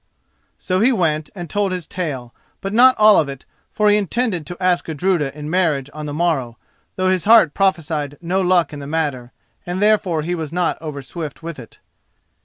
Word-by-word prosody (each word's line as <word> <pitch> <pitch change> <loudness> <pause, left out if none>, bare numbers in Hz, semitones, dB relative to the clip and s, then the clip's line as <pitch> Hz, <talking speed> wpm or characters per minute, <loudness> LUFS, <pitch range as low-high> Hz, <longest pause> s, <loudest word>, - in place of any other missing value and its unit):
So 185 0 -1
he 235 +6 +4
went 155 - 0
and 175 -3 -6
told 200 +3 -1
his 180 -3 -4
tale; 135 -10 -5 0.3
but 195 +1 -5
not 255 +3 +6
all 215 -1 +6
of 150 - 0
it, 135 -1 -9 0.3
for 210 - +1
he 210 0 +5
intended 200 - -1
to 175 - -7
ask 180 -1 +1
Gudruda 160 -2 0
in 150 0 -6
marriage 155 -5 0
on 150 0 -6
the - - -4
morrow, 145 -8 -1 0.4
though 185 0 +1
his 185 -2 -1
heart 215 -9 +6
prophesied 160 -7 -1
no 180 +3 -1
luck 180 -4 +2
in 145 - -6
the 140 - -7
matter, 145 -6 -2 0.3
and 180 +1 -4
therefore 200 -6 +2
he 175 +3 -2
was 160 -4 -4
not 175 0 -1
overswift 150 +1 -7
with 165 -4 -6
it. 115 -4 -13
170 Hz, 195 wpm, -20 LUFS, 150-185 Hz, 0.4 s, not